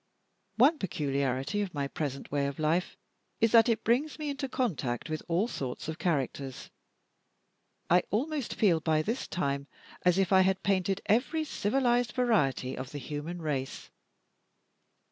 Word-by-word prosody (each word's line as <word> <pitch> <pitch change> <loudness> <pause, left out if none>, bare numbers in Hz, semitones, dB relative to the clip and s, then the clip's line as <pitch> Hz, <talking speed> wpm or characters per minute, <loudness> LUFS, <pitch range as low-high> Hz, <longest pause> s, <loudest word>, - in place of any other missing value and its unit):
One 285 +7 +5
peculiarity 140 -1 -1
of 190 -5 -4
my 140 -1 -1
present 140 -1 -4
way 140 -1 +1
of 140 - -5
life 160 +3 0 0.4
is, 225 -1 +3
that 230 0 +6
it 225 -2 +1
brings 265 +7 +1
me 300 -2 -3
into 275 -1 -4
contact 155 - -2
with 155 - -2
all 175 +6 +1
sorts 135 - -5
of 160 +1 -5
characters. 135 -5 -2 1.2
I 180 +1 +5
almost 280 +4 -1
feel, 180 -7 +3
by 155 -1 +1
this 230 +8 -2
time, 140 -4 -2 0.3
as 180 0 +3
if 195 -1 +2
I 190 - +7
had 190 0 +1
painted 195 0 +1
every 265 +9 +2
civilized 245 -3 +1
variety 185 - +1
of 130 0 -6
the 145 - -6
human 150 +5 -5
race. 135 -4 -3
180 Hz, 150 wpm, -30 LUFS, 145-230 Hz, 1.2 s, I